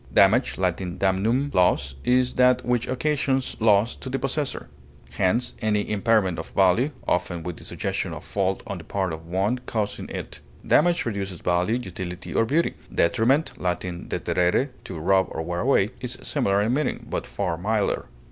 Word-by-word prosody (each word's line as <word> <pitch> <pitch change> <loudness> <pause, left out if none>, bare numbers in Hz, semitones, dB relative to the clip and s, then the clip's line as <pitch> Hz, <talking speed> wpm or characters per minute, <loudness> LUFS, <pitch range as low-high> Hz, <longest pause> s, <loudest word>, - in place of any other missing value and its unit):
Damage 105 +6 +4
(L. 95 -1 +2
damnum, 95 +9 0
loss) 80 -7 +2
is 125 0 +2
that 125 0 +4
which 120 -1 +1
occasions 135 -1 0
loss 110 0 +4
to 130 - -7
the 135 - -1
possessor; 135 +1 -2 0.4
hence, 115 +7 +1
any 105 -2 +1
impairment 105 -4 +2
of 80 - -6
value, 95 +8 +4 0.2
often 90 -1 0
with 85 -1 -5
the - - -11
suggestion - - -3
of - - -7
fault 95 -1 -1
on 100 - -5
the - - -10
part 95 -1 -2
of 80 +1 -8
the - - -15
one 100 +7 +1
causing 105 -2 -2
it; - - -6 0.3
damage 170 +3 +3
reduces 100 -6 -3
value, 90 +5 +1
utility, 90 -5 -6
or 115 - +3
beauty; 155 +8 +1 0.2
detriment 130 - +2
(L. 90 -1 +2
deterere, 90 +5 -1 0.2
to 90 - -6
rub 95 +4 +3
or 80 - -4
wear 85 +1 -3
away) 110 -4 +3
is 125 0 -4
similar 100 -8 +1
in 115 +3 +1
meaning, 145 0 -1
but - - -3
far 85 - -2
milder. 105 +4 0
100 Hz, 170 wpm, -25 LUFS, 90-125 Hz, 0.4 s, Damage